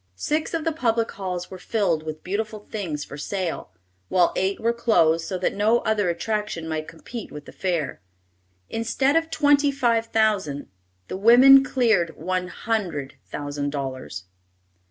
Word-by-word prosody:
Six 305 Hz, -, -1 dB
of 325 Hz, -, -2 dB
the 325 Hz, -, +1 dB
public 230 Hz, -7 st, 0 dB
halls 180 Hz, -2 st, -5 dB
were 185 Hz, -, -8 dB
filled 180 Hz, -7 st, 0 dB
with 155 Hz, 0 st, -7 dB
beautiful 210 Hz, +3 st, -3 dB
things 165 Hz, -9 st, -3 dB
for 145 Hz, -, -9 dB
sale, 180 Hz, -, -3 dB, 0.4 s
while 180 Hz, -2 st, +3 dB
eight 190 Hz, +1 st, 0 dB
were 230 Hz, +1 st, +1 dB
closed 165 Hz, -9 st, +2 dB
so 185 Hz, -, -2 dB
that 180 Hz, -, 0 dB
no 220 Hz, +4 st, +2 dB
other 210 Hz, -4 st, +1 dB
attractions 210 Hz, -2 st, -2 dB
might 155 Hz, -1 st, -3 dB
compete 215 Hz, +7 st, -8 dB
with 150 Hz, -1 st, -9 dB
the -, -, -11 dB
fair. 170 Hz, -, -2 dB, 0.7 s
Instead 235 Hz, +5 st, 0 dB
of 325 Hz, 0 st, +2 dB
twenty 290 Hz, -2 st, +3 dB
five 235 Hz, -4 st, +1 dB
thousand, 205 Hz, -11 st, 0 dB, 0.4 s
the -, -, -4 dB
women 255 Hz, +6 st, +8 dB
cleared 220 Hz, -11 st, +1 dB
one 180 Hz, +2 st, -2 dB
hundred 180 Hz, -, -3 dB
thousand 145 Hz, 0 st, -4 dB
dollars. 130 Hz, -9 st, -5 dB
195 Hz, 155 wpm, -24 LUFS, 160-230 Hz, 0.7 s, women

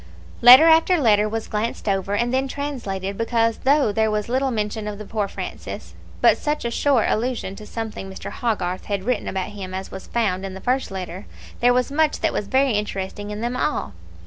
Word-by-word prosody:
Letter 250 Hz, +6 st, +10 dB
after 330 Hz, +2 st, +5 dB
letter 215 Hz, -5 st, +3 dB
was 225 Hz, +1 st, -4 dB
glanced 215 Hz, +2 st, -3 dB
over, 195 Hz, 0 st, 0 dB
and 240 Hz, +3 st, 0 dB
then 265 Hz, +1 st, +1 dB
translated, 215 Hz, -9 st, -4 dB
because 230 Hz, 0 st, +1 dB
though 275 Hz, -4 st, +3 dB
there 220 Hz, +1 st, +1 dB
was 210 Hz, +1 st, -2 dB
little 265 Hz, +2 st, +1 dB
mention 215 Hz, -2 st, -2 dB
of 210 Hz, -1 st, -5 dB
the 215 Hz, -, -8 dB
poor 210 Hz, -1 st, -2 dB
Francis, -, -, -7 dB, 0.3 s
but -, -, +5 dB
such 295 Hz, -4 st, -2 dB
a 235 Hz, -, -1 dB
short 265 Hz, -2 st, +2 dB
allusion 230 Hz, -4 st, -1 dB
to 215 Hz, -, -10 dB
something 220 Hz, -4 st, -5 dB
Mr. 190 Hz, -, -7 dB
Hogarth 190 Hz, -6 st, -2 dB
had 200 Hz, -2 st, -2 dB
written 245 Hz, -1 st, -1 dB
about 190 Hz, 0 st, -3 dB
him 190 Hz, -3 st, -7 dB
as 190 Hz, 0 st, -6 dB
was -, -, -8 dB
found 200 Hz, -6 st, 0 dB
in 190 Hz, -1 st, -5 dB
the -, -, -7 dB
first 255 Hz, +5 st, 0 dB
letter, 185 Hz, 0 st, -6 dB, 0.3 s
there 245 Hz, +1 st, +4 dB
was 250 Hz, +1 st, +1 dB
much 310 Hz, +1 st, +1 dB
that -, -, +1 dB
was 205 Hz, -, -2 dB
very 265 Hz, +3 st, +3 dB
interesting 205 Hz, -1 st, -3 dB
in 210 Hz, +1 st, -5 dB
them 240 Hz, +1 st, -2 dB
all. 255 Hz, -, -1 dB
220 Hz, 205 wpm, -22 LUFS, 200-250 Hz, 0.3 s, Letter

